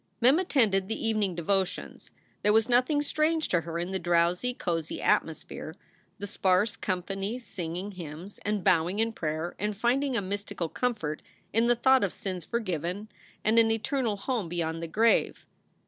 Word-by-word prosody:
Mem 260 +7 +5
attended 220 - +2
the 225 +1 -2
evening 210 -5 +1
devotions. 190 +2 -2 0.3
There 210 - +4
was 225 0 +4
nothing 255 +4 +3
strange 310 +2 +1
to 175 - +2
her 165 +1 -5
in 175 +2 -3
the 190 - -1
drowsy, 175 +6 +2
cozy 165 -9 -3
atmosphere, 160 0 -1 0.4
the 205 - -5
sparse 205 +2 +2
company 195 +2 -2
singing 185 -4 -5
hymns 175 +1 -8
and 210 -2 -1
bowing 175 +3 +3
in 225 +1 +1
prayer 160 -1 -3
and 210 +1 -2
finding 255 +3 +1
a - - +1
mystical 200 -3 -3
comfort 210 -12 -2 0.3
in 225 +2 +3
the 240 - +4
thought 260 +1 +4
of 195 - 0
sins 185 -3 -5
forgiven 185 -1 -3 0.3
and 220 +2 +4
an 225 -1 +5
eternal 225 0 0
home 215 -4 -2
beyond 165 -1 -2
the 165 - -4
grave. 225 +7 +2
200 Hz, 165 wpm, -28 LUFS, 175-230 Hz, 0.4 s, Mem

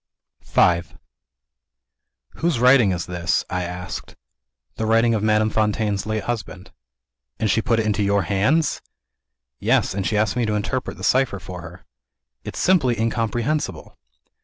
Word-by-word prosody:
V 85 -1 +3 1.6
"Whose 165 -7 0
writing 125 -4 +5
is 90 -1 -2
this?" 90 -1 -1
I 90 - -1
asked. 90 +1 -6 0.6
"The 110 - -2
writing 115 +1 +3
of 110 - 0
Madame 110 0 +2
Fontaine's 105 -1 0
late 110 -1 -2
husband." 100 -5 -5 0.7
"And 110 -2 0
she 115 - +2
put 115 0 +1
it 110 - 0
into 105 -1 0
your 100 -1 +2
hands!" 110 - +1 0.8
"Yes - - +2
and 95 -3 -2
asked 105 -1 +1
me 120 -2 0
to 105 - 0
interpret 125 +5 -3
the - - -10
cipher 130 -5 +2
for 90 -2 -8
her." 85 -1 -12 0.6
"It's - - -7
simply 130 -11 +2
incomprehensible." 115 +6 -2
110 Hz, 140 wpm, -22 LUFS, 95-120 Hz, 1.6 s, writing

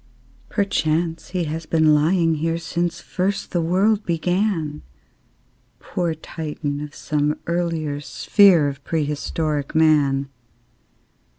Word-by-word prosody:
Perchance 165 -5 0
he 180 -1 -1
has 160 +1 -4
been 160 -2 +4
lying 165 +2 +3
here 165 +2 -1
Since 170 0 -2
first 195 +2 -2
the 175 - +1
world 195 +6 +2
began, 175 - -1 1.0
Poor 170 -3 -2
Titan 150 -2 -5
of 150 -1 -8
some 150 0 -1
earlier 165 -4 -2
sphere 180 0 +4
Of 140 0 -6
prehistoric 150 -1 -2
Man! 145 -4 +3
160 Hz, 105 wpm, -22 LUFS, 150-175 Hz, 1.0 s, been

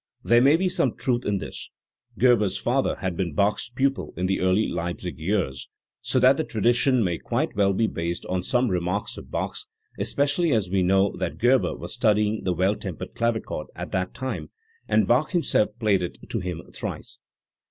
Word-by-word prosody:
There 120 +1 +5
may 140 +4 +6
be 185 +3 +1
some 180 - 0
truth 125 -3 -1
in 100 -1 +1
this. - - -7 0.5
Gerber* 120 -4 +4
s 95 -1 -2
father 130 +3 0
had 95 -3 -2
been 85 -3 -2
Bach's 100 +5 +1
pupil 135 +2 -1
in 90 - -1
the 95 +1 0
early 95 +4 +2
Leipzig 85 0 -4
years, 80 -6 -2 0.3
so - - -1
that 130 +2 +5
the 160 - 0
tradition 120 +1 +2
may 85 -3 -1
quite - - -2
well 100 -1 +3
be 105 +4 +1
based 85 -3 -3
on 90 0 -1
some 125 +6 +1
remark 90 +3 -1
of - - -13
Bach's, - - -3 0.3
especially 145 +3 +1
as 100 -5 0
we 95 -1 +2
know 95 +2 +3
that - - -3
Gerber 125 +2 +3
was - - -7
studying 105 0 +1
the 90 - +1
Well 95 +4 +2
tempered 95 -3 -7
Clavichord 115 -9 -2
at - - -6
that 95 0 -2
time, 130 0 -4 0.4
and - - +3
Bach - - +2
himself 165 -11 +2
played 105 -4 +2
it 90 - -4
to - - -1
him 90 -2 -5
thrice*. - - -5
105 Hz, 190 wpm, -25 LUFS, 90-125 Hz, 0.5 s, may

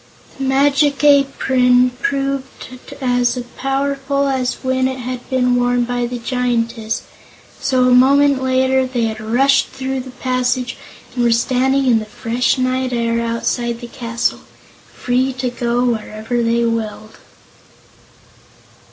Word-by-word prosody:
The 270 - -2
Magic 280 +2 +2
Apron 260 -3 +4
proved 275 -3 -4
as 245 -1 +1 0.2
powerful 275 +1 -1
as 260 -2 -1
when 260 0 +1
it 260 0 -4
had 250 0 -6
been 250 -2 +2
worn 245 0 +1
by 245 0 -2
the 245 +1 -5
Giantess, 235 -2 -2 0.6
so 255 -1 +1
a 250 - +3
moment 275 +2 +4
later 260 0 +2
they 250 -2 -2
had 220 -1 -2
rushed 255 +6 +2
through 265 0 -4
the 260 0 -7
passage 255 0 -1 0.4
and 245 -1 -1
were 235 - +3
standing 260 +3 +1
in 240 -3 +4
the 215 - -6
fresh 240 +3 -1
night 255 0 -1
air 230 -1 0
outside 235 +1 -2
the 240 - -8
castle, 235 -1 -3 0.5
free 255 +2 -1
to 250 -1 -3
go 240 0 -1
wherever 220 0 -2
they 235 0 +1
willed. 220 -1 -4
250 Hz, 135 wpm, -18 LUFS, 240-265 Hz, 0.6 s, Apron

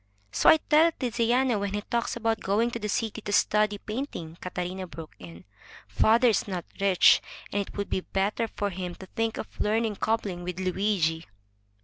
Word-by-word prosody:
So - - +4
I - - +8
tell 315 +2 +4
Tiziano 245 -1 +1
when 200 0 -2
he 205 - -2
talks 235 +3 -2
about 225 -1 0
going 220 +5 +1
to 235 - -4
the 210 -1 -4
city 220 +1 -2
to 205 - -5
study 210 0 +2
painting," 215 - -5
Catarina 180 +1 -4
broke 165 -2 -10
in. 85 -1 -12 0.4
"Father 220 - +4
is 215 - +1
not 180 -3 -4
rich, 195 -3 +5 0.3
and 205 - 0
it 200 - -8
would 200 - -2
be 185 - 0
better 200 +5 -1
for 205 -1 -3
him 180 -1 -5
to 190 - -11
think 225 +4 -2
of - - -8
learning 215 0 0
cobbling 210 -5 -1
with 180 0 -5
Luigi." 185 -4 0
205 Hz, 185 wpm, -27 LUFS, 185-225 Hz, 0.4 s, I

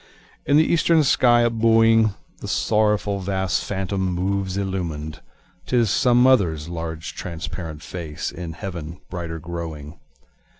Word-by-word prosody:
In 145 - +5
the 155 - +5
eastern 165 -1 +3
sky 120 -3 +4
up 120 - +1
buoying, 115 -1 +4 0.2
The - - -7
sorrowful 105 -2 +1
vast 95 -1 -1
phantom 95 0 -3
moves 95 +1 -1
illuminâd, 85 -6 -3 0.5
(âTis 120 -4 +2
some 125 +2 +4
motherâs 90 - +3
large 80 -2 -5
transparent 80 -2 -6
face, 80 -4 -5
In 85 -2 -7
heaven 85 -2 -7
brighter 85 -2 -4
growing.) 80 -2 -7
95 Hz, 125 wpm, -22 LUFS, 85-110 Hz, 0.5 s, In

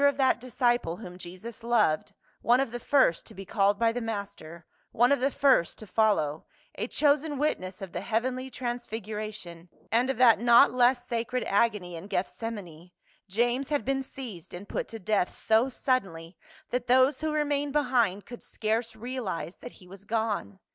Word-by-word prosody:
2oo 285 - +6
of 280 - -4
that 265 -3 +2
disciple 240 -8 0
whom 180 -4 -9
Jesus 185 +6 -10
loved, 210 -8 +2 0.3
one 240 +2 +4
of 270 -4 0
the 240 - -5
first 260 -9 +3
to - - -13
be 195 +1 -8
called 200 +1 +2
by 230 +1 +3
the 245 +1 -4
Master, 200 -7 -6 0.3
one 245 +3 +3
of 280 - +3
the 265 +2 +2
first 270 - +3
to 215 - -10
follow, 185 -8 +1 0.3
a - - -3
chosen 295 0 +1
witness 195 -10 -2
of 190 - -7
the - - -4
heavenly 255 +3 -2
transfiguration, 215 -7 -6 0.2
and 240 +4 +2
of 270 - -1
that 235 -4 +6
not 240 +1 +6
less 245 0 +3
sacred 240 +1 -2
agony 200 -4 +1
in 165 +4 -8
Gethsemane, 185 -4 -5 0.4
James 240 +6 +1
had 290 -6 -1
been 270 +1 0
seized 235 -12 -8
and 195 +3 -9
put - - -3
to 225 - -8
death 205 -2 0
so 225 +4 +2
suddenly 190 -11 -2 0.4
that 245 0 -2
those 260 +3 +4
who 315 0 -1
remained 290 -1 0
behind 245 -9 +1
could 240 - -10
scarce 225 +1 -2
realize 220 -7 -5
that 245 - -10
he 180 - -17
was 195 +2 -12
gone. 220 -2 -2
230 Hz, 175 wpm, -28 LUFS, 195-255 Hz, 0.4 s, 2oo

